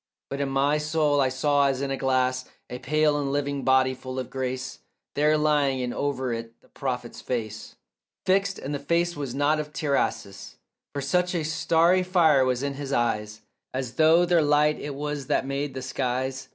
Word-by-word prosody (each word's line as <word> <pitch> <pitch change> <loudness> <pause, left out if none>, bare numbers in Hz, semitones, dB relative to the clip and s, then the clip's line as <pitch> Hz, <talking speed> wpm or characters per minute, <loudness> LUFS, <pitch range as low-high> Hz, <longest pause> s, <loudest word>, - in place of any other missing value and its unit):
But 140 +1 -3
in 140 - -1
my 140 +3 +2
soul 150 -2 +1
I 130 - +2
saw 140 +2 +2
as 135 -1 0
in 140 0 -2
a - - 0
glass 130 -1 0 0.3
A 125 - -5
pale 155 -1 +2
and 140 -1 -2
living 140 -1 -2
body 130 0 +3
full 130 0 -8
of 130 -2 -4
grace 130 0 -4 0.3
There 150 +1 +3
lying, 145 -3 +2
and 120 -1 -3
over 130 -3 -2
it 115 0 -7
the - - -26
prophet's 125 -3 -5
face 110 -4 -4 0.5
Fixed; 195 +1 +2
and 140 - -5
the 145 - -2
face 170 +4 0
was 140 -4 -5
not 145 +2 +2
of 150 0 -5
Tiresias, 105 -10 -2 0.4
For 140 - -2
such 180 +6 +1
a 165 - 0
starry 165 +3 +3
fire 170 -7 +4
was 130 0 0
in 140 0 -1
his 140 0 -6
eyes 110 -4 -1 0.3
As 130 -2 -3
though 165 +2 +5
their 175 -1 +3
light 150 0 +3
it 145 -1 -5
was 145 -1 -4
that - - +1
made 140 0 -3
the 130 - -5
skies. 130 0 -3
140 Hz, 190 wpm, -26 LUFS, 130-150 Hz, 0.5 s, though